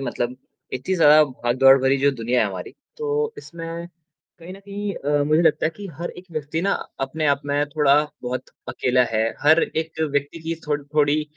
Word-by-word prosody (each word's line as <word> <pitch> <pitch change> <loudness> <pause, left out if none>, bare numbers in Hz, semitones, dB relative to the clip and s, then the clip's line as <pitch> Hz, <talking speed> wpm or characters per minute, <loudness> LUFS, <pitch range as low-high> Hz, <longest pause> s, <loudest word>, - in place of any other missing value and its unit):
मतलब 125 -1 -3 0.4
इतनी 130 +9 -2
ज़्यादा 155 -3 +7
भागदौड़ 130 0 +4
भरी 135 +1 +3
जो 140 +1 +3
दुनिया 125 -1 0
है 110 - +3
हमारी, 95 -2 -6 0.3
तो 450 0 -1
इसमें 170 0 -7 0.5
कहीं 170 +2 -10
न 195 - -11
कहीं 200 0 -5
अ, 145 +1 0
मुझे 155 +3 +3
लगता 155 -1 +3
है - - -1
कि 205 -1 -7
हर 175 - -4
एक 180 - -12
व्यक्ति 155 +1 -3
ना 200 +1 +2 0.3
अपने 150 +4 -1
आप 140 -1 +2
में 145 +1 +1
थोड़ा 145 -2 +3 0.3
बहुत 125 +1 -4 0.2
अकेला 125 0 +2
है 110 0 +2 0.2
हर 155 +3 +5
एक 160 0 -3
व्यक्ति 145 +1 -1
की 165 +1 -2
थो 150 - +1
थोड़ी 150 +1 +2
150 Hz, 190 wpm, -22 LUFS, 135-165 Hz, 0.5 s, ज़्यादा